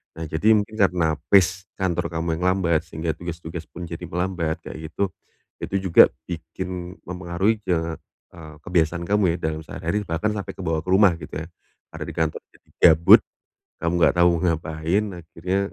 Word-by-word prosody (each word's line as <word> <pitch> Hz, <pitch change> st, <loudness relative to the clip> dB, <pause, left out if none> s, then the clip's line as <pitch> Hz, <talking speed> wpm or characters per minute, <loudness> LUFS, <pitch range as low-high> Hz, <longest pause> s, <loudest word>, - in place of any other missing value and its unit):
Nah, 80 Hz, 0 st, -5 dB
jadi 85 Hz, +9 st, +3 dB
mungkin 110 Hz, 0 st, 0 dB
karena 85 Hz, -5 st, +2 dB, 0.2 s
pace 95 Hz, 0 st, +4 dB, 0.2 s
kantor 90 Hz, -2 st, -1 dB
kamu 80 Hz, 0 st, -1 dB
yang -, -, -4 dB
lambat, 85 Hz, -3 st, +1 dB
sehingga 80 Hz, 0 st, -3 dB
tugas-tugas 85 Hz, -1 st, -7 dB
pun 85 Hz, +1 st, -9 dB
jadi 85 Hz, +1 st, -6 dB
melambat, 90 Hz, -2 st, -2 dB
kayak 80 Hz, 0 st, -8 dB
gitu, 100 Hz, +2 st, 0 dB, 0.6 s
itu -, -, -5 dB, 0.2 s
juga -, -, +9 dB, 0.2 s
bikin 90 Hz, +1 st, -6 dB
mempengaruhi 90 Hz, +4 st, -1 dB
ke 80 Hz, -2 st, -1 dB, 0.3 s
eee, 80 Hz, -3 st, -12 dB
kebiasaan 85 Hz, -1 st, 0 dB
kamu 100 Hz, -5 st, +3 dB
ya, -, -, -5 dB
dalam 80 Hz, -, -5 dB
sehari-hari, 90 Hz, +7 st, -3 dB
bahkan 85 Hz, +6 st, 0 dB
sampai 100 Hz, -2 st, -5 dB
kebawa 80 Hz, -4 st, -1 dB
ke -, -, -6 dB
rumah 95 Hz, -2 st, +6 dB
gitu 75 Hz, -, -10 dB
ya. 80 Hz, +2 st, -5 dB, 0.4 s
Karena -, -, -6 dB
di -, -, -7 dB
kantor 80 Hz, -1 st, -1 dB
jadi -, -, -26 dB, 0.2 s
gabut, 80 Hz, +2 st, +7 dB, 0.6 s
kamu 85 Hz, +1 st, 0 dB
nggak -, -, +4 dB
tahu 85 Hz, 0 st, +6 dB
mau 85 Hz, -, 0 dB
ngapain, 80 Hz, +4 st, 0 dB, 0.2 s
akhirnya 85 Hz, +4 st, -3 dB
85 Hz, 170 wpm, -23 LUFS, 80-95 Hz, 0.6 s, juga